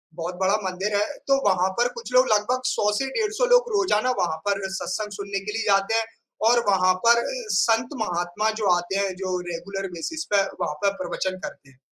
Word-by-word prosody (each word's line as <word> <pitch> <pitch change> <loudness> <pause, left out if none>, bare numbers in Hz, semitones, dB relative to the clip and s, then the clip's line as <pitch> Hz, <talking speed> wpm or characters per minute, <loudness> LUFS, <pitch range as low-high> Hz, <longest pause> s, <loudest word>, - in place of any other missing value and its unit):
बहुत 175 +1 -4
बड़ा 190 +2 +3
मंदिर 190 +3 -2
है, 205 +1 +2 0.2
तो 275 - +5
वहाँ 185 0 +2
पर 240 - +4
कुछ 240 +1 -8
लोग 255 +1 +5
लगभग 225 +5 +1
100 210 -3 +1
से 270 - 0
डेढ़ 425 -2 0
100 - - +4
लोग - - +3
रोज़ाना 255 - +2
वहाँ 160 -3 0
पर 200 -1 +1
सत्संग 205 +2 -3
सुनने 200 0 -3
के 200 +2 -6
लिए 225 +1 -1
जाते 195 +2 +3
हैं 225 0 +2 0.4
और 240 0 +4
वहाँ 185 -1 +4
पर 235 0 +7
अ, - - -2 0.3
संत 230 +3 +2
महात्मा 175 +3 -1
जो 200 - +2
आते 175 +2 -4
हैं, 195 -1 0
जो 185 -1 -3
रेगुलर 195 +3 -5
बेसिस 315 - -5
पे 200 - +5 0.2
वहाँ 150 - -1
पे 200 - +3
प्रवचन 185 0 -3
करते 135 - -9
हैं। 130 - -26
200 Hz, 210 wpm, -24 LUFS, 185-230 Hz, 0.4 s, पर